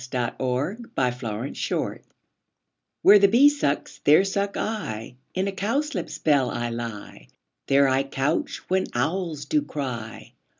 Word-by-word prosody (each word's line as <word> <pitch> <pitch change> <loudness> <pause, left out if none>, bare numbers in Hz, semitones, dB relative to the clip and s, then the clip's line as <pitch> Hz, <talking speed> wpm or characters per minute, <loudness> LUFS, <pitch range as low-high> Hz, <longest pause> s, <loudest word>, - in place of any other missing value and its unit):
Fairy 125 -2 -2
Land 145 - -2
iv 125 -1 -2 1.0
WHERE 205 +1 +8
the 200 - +6
bee 245 +8 +6
sucks, 285 - -2
there 155 +6 +6
suck 200 +1 -2
I: 135 - -4 0.2
In 190 +1 0
a - - -1
cowslip's 250 +11 -2
bell 140 -5 +2
I 120 0 -2
lie; 115 - -7 0.4
There 140 0 +5
I 130 0 +2
couch 135 +3 -2
when 190 0 +1
owls 160 +3 -1
do 305 -1 +1
cry. 125 - -6
145 Hz, 130 wpm, -25 LUFS, 125-195 Hz, 1.0 s, WHERE